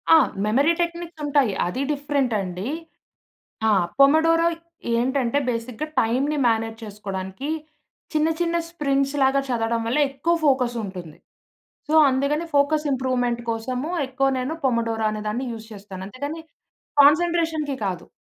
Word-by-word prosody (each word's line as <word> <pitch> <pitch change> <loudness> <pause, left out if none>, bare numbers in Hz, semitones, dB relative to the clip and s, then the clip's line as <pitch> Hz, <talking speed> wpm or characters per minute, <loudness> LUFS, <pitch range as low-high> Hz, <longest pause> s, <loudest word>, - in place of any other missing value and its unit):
ఆ! - - +9 0.3
మెమరీ 275 +10 +3
టెక్నిక్సుంటాయి. 315 - 0
అది 180 +9 -3
డిఫరెంటండి. 245 -10 -1 1.0
ఆ! - - +4 0.3
పొమోడోరో 325 +4 +5 0.5
ఏంటంటే, 260 +1 +1
బేసిక్‌గా 245 +5 -3
టైమ్‌ని 270 +7 0
మేనేజ్ 225 -1 0
చేసుకోడానికీ 200 +4 -6 0.6
చిన్న 310 +1 +2
చిన్న 340 -1 0
స్ప్రింగ్స్‌ 275 -4 0
లాగా 270 +1 +3
చదవడం 230 -1 0
వల్ల 255 +6 +1
ఎక్కువ 275 +5 0
ఫోకసుంటుంది. 225 - -1 0.7
సో, - - 0 0.2
అందుకని 280 +5 0
ఫోకస్ 300 +2 +3
ఇంప్రూవ్‌మెంట్ 245 -2 0
కోసము 250 +6 -2 0.2
ఎక్కువ 265 +1 0
నేను 265 +6 -2
పొమోడోరో 230 -3 0
అనే 215 0 -4
దాన్ని 240 +5 -2
యూస్ 220 -1 -9
చేస్తాను. 195 -2 -9
అంతేగానీ, 285 +9 -5 0.6
కాన్సంట్రేషన్‌కి 320 -1 +3
కాదు. 180 -3 -4
260 Hz, 115 wpm, -23 LUFS, 225-295 Hz, 1.0 s, ఆ